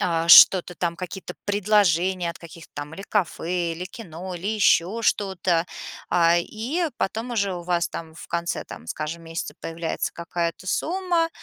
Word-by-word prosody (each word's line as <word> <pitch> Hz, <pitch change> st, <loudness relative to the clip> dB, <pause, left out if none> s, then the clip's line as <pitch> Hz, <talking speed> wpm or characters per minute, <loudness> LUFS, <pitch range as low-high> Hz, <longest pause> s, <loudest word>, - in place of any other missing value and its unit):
а, 165 Hz, -1 st, 0 dB
что-то 180 Hz, +1 st, +8 dB
там, 170 Hz, -1 st, -2 dB
какие-то 180 Hz, 0 st, -7 dB
предложения 190 Hz, -4 st, +2 dB
от 170 Hz, -, -5 dB
каких-то 170 Hz, -1 st, -13 dB
там 145 Hz, +2 st, -6 dB
или 195 Hz, -, -8 dB
кафе, 175 Hz, -3 st, -1 dB
или 175 Hz, +2 st, -5 dB
кино, 185 Hz, -2 st, -8 dB
или 180 Hz, +4 st, -4 dB
еще 215 Hz, 0 st, +2 dB
что-то. 185 Hz, -5 st, +1 dB, 0.4 s
А, 170 Hz, 0 st, +4 dB
и 250 Hz, -, -2 dB
потом 225 Hz, +5 st, -2 dB
уже 200 Hz, -5 st, 0 dB
у 175 Hz, -, -6 dB
вас, 175 Hz, -1 st, 0 dB
там, 160 Hz, -1 st, -7 dB
в -, -, -11 dB
конце 170 Hz, 0 st, -2 dB
там, 80 Hz, -, -11 dB
скажем, 155 Hz, +2 st, -4 dB
месяца 165 Hz, 0 st, -5 dB
появляется 165 Hz, 0 st, -3 dB
какая-то 170 Hz, +2 st, -4 dB
сумма. 345 Hz, -, 0 dB
175 Hz, 160 wpm, -24 LUFS, 170-205 Hz, 0.4 s, что-то